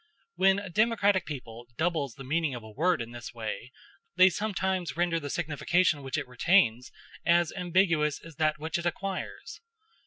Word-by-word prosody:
When 190 - +4
a 200 0 -5
democratic 205 -1 +2
people 120 -5 -8
doubles 160 -7 -1
the 135 - -9
meaning 150 0 0
of 120 - -8
a 110 - -11
word 160 +2 +1
in 115 - -11
this 120 0 -9
way, 115 +2 -5 0.4
they 185 +1 +7
sometimes 190 -4 -2
render 170 -1 +1
the 145 -2 -6
signification 160 +1 +1
which 135 -1 -3
it - - -3
retains 125 - +2 0.3
as 170 -1 +3
ambiguous 170 -5 +2
as 165 -3 -13
that 155 -1 +1
which 160 +2 -3
it 170 - -1
acquires. 190 +2 -5
165 Hz, 165 wpm, -28 LUFS, 135-185 Hz, 0.4 s, they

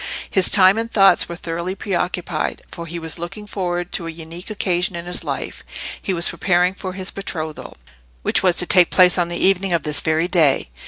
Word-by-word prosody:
His 190 -2 +4
time 195 +1 +6
and 230 0 -4
thoughts 195 -5 +4
were 170 - -5
thoroughly 170 +2 -4
preoccupied, 180 -4 -3
for 170 0 -8
he 170 +2 -6
was 165 0 -5
looking 175 +5 -7
forward 175 -3 -3
to 170 - -3
a - - -4
unique 165 +3 -8
occasion 180 -3 0
in 170 0 -6
his 180 0 -3
life: - - -5 0.4
he - - -3
was 170 -2 +1
preparing 180 0 +1
for 190 -1 -7
his 185 0 -4
betrothal, 160 -6 -6 0.5
which - - +1
was 180 -2 +2
to 180 - +5
take 180 -1 +5
place 180 0 +5
on 175 - +1
the 175 - -4
evening 190 -1 +2
of 170 - 0
this 150 -1 -1
very 160 +1 0
day. 160 -7 +2
180 Hz, 205 wpm, -20 LUFS, 170-190 Hz, 0.5 s, time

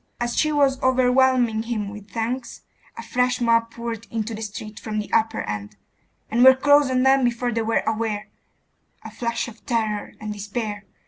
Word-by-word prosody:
as 240 0 -2
she 305 - +2
was 280 -3 +2
overwhelming 255 -3 +3
him 225 -3 -3
with 210 0 -10
thanks, 235 +5 -4 0.4
a 230 - -6
fresh 250 +2 0
mob 230 -1 +2
poured 230 -1 -6
into 225 +1 -3
the 220 - -6
street 215 0 -7
from 215 -1 -5
the 210 - -4
upper 225 0 +2
end, 105 -1 -5 0.6
and 235 +3 +3
were 260 0 +9
close 285 +1 +4
on 255 0 +2
them 265 0 +4
before 240 0 0
they 230 0 -1
were 225 0 0
aware.... 215 -2 -2 0.8
A - - -9
flush 235 0 -2
of 230 -1 -12
terror 220 -4 -1
and 215 -1 -5
despair 205 0 -5
230 Hz, 180 wpm, -23 LUFS, 215-250 Hz, 0.8 s, were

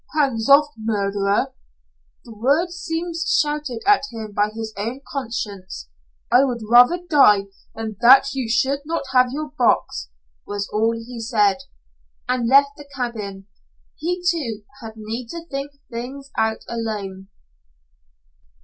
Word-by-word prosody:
"Hands 265 -5 +1
off, 290 +2 +7
murderer!" 200 -2 0 0.7
The 230 - -11
words 305 - +1
seemed 335 0 -3
shouted 300 -7 0
at 410 0 +5
him 220 -3 -7
by 205 +1 +2
his 220 0 -6
own 230 +6 -4
conscience. 205 - -5 0.4
"I 250 +3 +6
would 245 -4 -1
rather 245 +9 +6
die 210 - +5 0.3
than 220 -2 -5
that 265 +3 +7
you 260 -4 -3
should 265 +4 +2
not 325 +1 -2
have 255 -1 +4
your 300 +2 -4
box," 235 - +1 0.3
was 205 0 -4
all 225 +2 +2
he 235 +1 -8
said, 215 -4 +2 0.7
and 250 -2 0
left 280 +1 +5
the 290 -1 -13
cabin. 210 -6 -4 0.5
He, 355 +2 -3
too, 250 -12 -1 0.2
had 225 -1 -8
need 225 +3 -6
to 335 +7 -7
think 275 -2 -5 0.2
things 265 +4 -7
out 220 0 0
alone. 205 -5 -5
240 Hz, 135 wpm, -21 LUFS, 215-280 Hz, 0.7 s, off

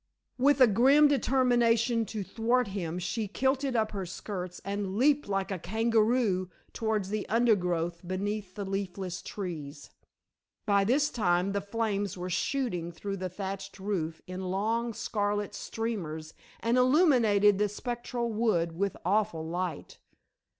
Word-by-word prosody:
With 285 +2 +4
a - - +11
grim 265 +7 +5
determination 240 -4 +2
to 210 -1 -4
thwart 235 +3 +1
him 175 -4 -3
she 205 +5 -2
kilted 265 +4 0
up 220 -1 +1
her 195 -3 -4
skirts 180 -1 -6
and 200 0 -3
leaped 280 -1 +3
like 195 0 -1
a 190 - -2
kangaroo 220 -1 +1 0.2
towards 215 -4 -1
the 215 0 -3
undergrowth 180 -7 +1
beneath 195 +1 -3
the 205 - -4
leafless 190 -2 -4
trees. 155 -7 -6 0.7
By 200 -2 +3
this 280 +7 +2
time 180 -3 +1
the 200 0 -1
flames 205 -2 -2
were 180 +1 -4
shooting 190 -3 -1
through 195 +4 -5
the 185 0 -3
thatched 195 +1 -6
roof 175 -5 -3
in 185 0 -5
long 225 +4 -1
scarlet 205 -1 -1
streamers 175 -9 -4 0.3
and 235 +2 +2
illuminated 245 - +4
the 210 0 +2
spectral 240 +2 -3
wood 210 -7 +1
with 200 +2 -1
awful 200 -4 +1
light. 175 -2 -4
205 Hz, 135 wpm, -29 LUFS, 185-230 Hz, 0.7 s, a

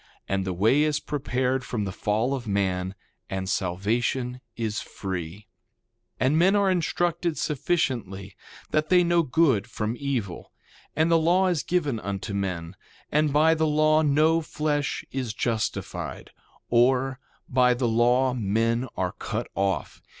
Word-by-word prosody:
And 95 -1 -1
the 95 - -2
way 110 +11 +3
is 150 -1 +1
prepared 130 -3 -1
from 115 -4 -3
the 95 - -3
fall 110 +7 0
of 125 -4 -4
man, 95 -2 -1 0.3
and 95 0 -3
salvation 115 +7 -1 0.2
is 110 -3 -2
free. 95 +1 -6 0.7
2:5 - - +1
And 150 +5 +3
men 190 +4 +4
are 200 -2 +3
instructed 175 -1 0
sufficiently 120 - -2 0.4
that 155 0 +1
they 180 0 +5
know 170 0 +3
good 135 -8 +2
from 110 +2 -3
evil. 125 -10 -3 0.4
And 160 +2 +2
the 165 - +5
law 180 +4 +3
is 170 -5 0
given 150 -9 0
unto 100 0 -4
men. 90 -3 -3 0.4
And 150 0 +2
by 155 +3 +4
the 160 -1 +1
law 155 +1 +3
no 155 +2 +3
flesh 150 -2 -2
is 125 -5 -3
justified; 110 -2 -3 0.4
or, 130 +2 +2 0.3
by 125 -1 +3
the 120 0 0
law 120 +3 +3
men 115 +2 0
are 90 -1 0
cut - - -5
off. 95 0 -2
125 Hz, 145 wpm, -26 LUFS, 105-155 Hz, 0.7 s, they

